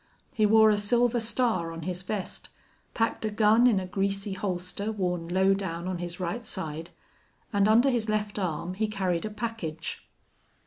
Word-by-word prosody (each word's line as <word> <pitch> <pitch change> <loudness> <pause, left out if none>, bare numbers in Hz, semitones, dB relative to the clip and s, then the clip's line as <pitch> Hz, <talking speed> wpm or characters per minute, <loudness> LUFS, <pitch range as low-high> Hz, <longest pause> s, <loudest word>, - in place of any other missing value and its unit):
He 215 -5 +3
wore 220 0 +6
a 205 - +2
silver 240 +3 +2
star 225 -7 0
on 165 0 -7
his 180 +1 -3
vest, 190 0 -5 0.5
packed 225 -1 0
a 215 - 0
gun 215 +3 +5
in 220 -6 +4
a 185 - -4
greasy 195 +1 -1
holster 190 +2 -3
worn 180 -5 -2
low 190 +2 +3
down 180 -3 -3
on 185 -2 -3
his 175 0 -5
right 185 +7 -3
side, 165 -5 -5 0.6
and 200 0 +4
under 235 +5 +5
his 230 -3 -1
left 210 -1 -1
arm 175 -1 -2
he 215 +3 -1
carried 190 -3 -1
a - - -2
package. 210 -8 -5
200 Hz, 175 wpm, -28 LUFS, 180-220 Hz, 0.6 s, wore